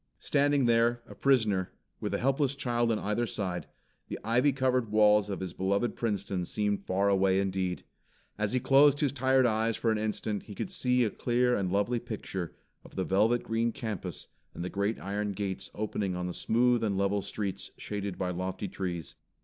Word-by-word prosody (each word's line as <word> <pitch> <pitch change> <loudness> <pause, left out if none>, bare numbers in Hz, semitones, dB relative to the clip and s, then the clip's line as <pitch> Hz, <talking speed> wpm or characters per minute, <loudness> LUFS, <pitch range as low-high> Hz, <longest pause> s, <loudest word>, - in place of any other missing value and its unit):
Standing 145 -2 +2
there, 120 0 +3
a - - -11
prisoner, 110 -9 +2 0.3
with 105 - -3
a 100 - 0
helpless 135 +2 +1
child 120 -3 0
on 110 - +1
either 105 +4 -1
side, 90 -5 -3 0.4
the - - -4
ivy 120 +6 +3
covered 130 -4 0
walls 105 -1 +5
of 95 - -4
his 90 -2 -4
beloved 100 +6 0
Princeton 100 -5 -2
seemed 105 +2 -1
far 95 +2 +2
away 95 -1 +3
indeed. 95 -2 -1 0.5
As 105 -1 -1
he 130 - +2
closed 140 +3 +5
his 140 -3 +2
tired 130 -1 +3
eyes 110 -1 +1
for 115 - +1
an 110 - 0
instant 105 -1 -2
he 105 - -10
could 185 - -4
see 125 -7 +2
a 110 - 0
clear 125 0 +1
and 95 -3 -1
lovely 105 +5 +1
picture 100 -6 -5 0.3
of - - -15
the 95 - 0
velvet 110 +6 +2
green 115 +1 0
campus 110 -4 -5 0.3
and - - -4
the 90 - -4
great 100 +3 -1
iron 100 +1 -2
gates 95 -1 -4
opening 100 -3 -2
on 90 0 -3
the 90 - -3
smooth 120 +3 +2
and 100 -3 0
level 100 +1 +1
streets 100 -1 -4
shaded 100 -2 -4
by 90 -1 -1
lofty 95 +3 -3
trees. 90 -4 -4
105 Hz, 190 wpm, -30 LUFS, 95-120 Hz, 0.5 s, walls